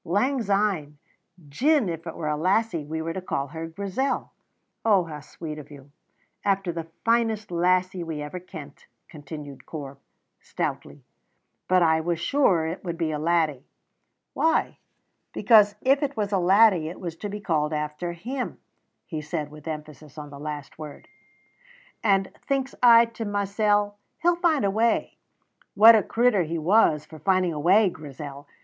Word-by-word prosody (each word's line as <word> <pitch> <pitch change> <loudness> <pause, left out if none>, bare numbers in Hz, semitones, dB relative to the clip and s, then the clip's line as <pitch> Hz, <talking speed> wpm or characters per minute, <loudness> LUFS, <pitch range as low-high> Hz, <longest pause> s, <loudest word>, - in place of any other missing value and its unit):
"Lang 255 +9 +1
syne. 195 -8 0 0.5
Gin 270 - +2
it 165 -1 -4
were 155 - -4
a 150 - 0
lassie 185 +1 +1
we 160 +2 -4
were 165 0 -3
to 190 - -4
call 140 -6 -3
her 160 +2 -6
Grizel 200 +10 -2 0.3
" - - -51
"Oh, 205 -5 +4
how 155 -3 -8
sweet 155 +1 -8
of 145 - -12
you!" 140 -1 -14 0.5
"After 195 -2 +1
the 165 -1 -6 0.2
finest 225 -3 +1
lassie 180 +1 +1
we 160 -2 -5
ever 150 +5 -5
kent," 160 -6 -11 0.2
continued 145 -2 -10
Corp, 140 -3 -8 0.4
stoutly. - - -5 0.6
"But 185 -1 +4
I 160 -1 +3
was 170 0 -1
sure 190 - +2
it 165 +3 -5
would 170 -2 -4
be 165 -2 -1
a 150 - -3
laddie." 155 -4 +1 0.7
"Why?" 325 0 +1 0.5
"Because 210 -3 +5
if 270 +2 +3
it 285 -4 -2
was 205 -1 -1
a 195 - +2
laddie 185 -3 +4
it 175 - -9
was 170 -3 -5
to 205 - -5
be 205 +1 -5
called 155 -6 0
after 150 +3 -3
Him," 245 +10 -5 0.5
he 155 -3 -5
said, 150 -1 -4
with 150 +1 -12
emphasis 150 -2 -8
on 150 -1 -8
the 140 - -10
last 150 0 -7
word; 150 -2 -9 1.0
"and 195 -3 +2
thinks 270 -1 -1
I 235 -1 +8
to 230 0 -7
mysel', 205 0 0 0.2
'He'll 350 0 +4
find 320 - +2
a 195 - +2
way.' 225 +3 0 0.6
What 220 +3 +9
a 215 - +4
crittur 230 0 +2
he 165 0 -2
was 160 -3 +3
for 155 - -12
finding 185 +1 +1
a 150 - -4
way, 195 +7 +5
Grizel! 145 -1 -9
175 Hz, 165 wpm, -25 LUFS, 155-210 Hz, 1.0 s, What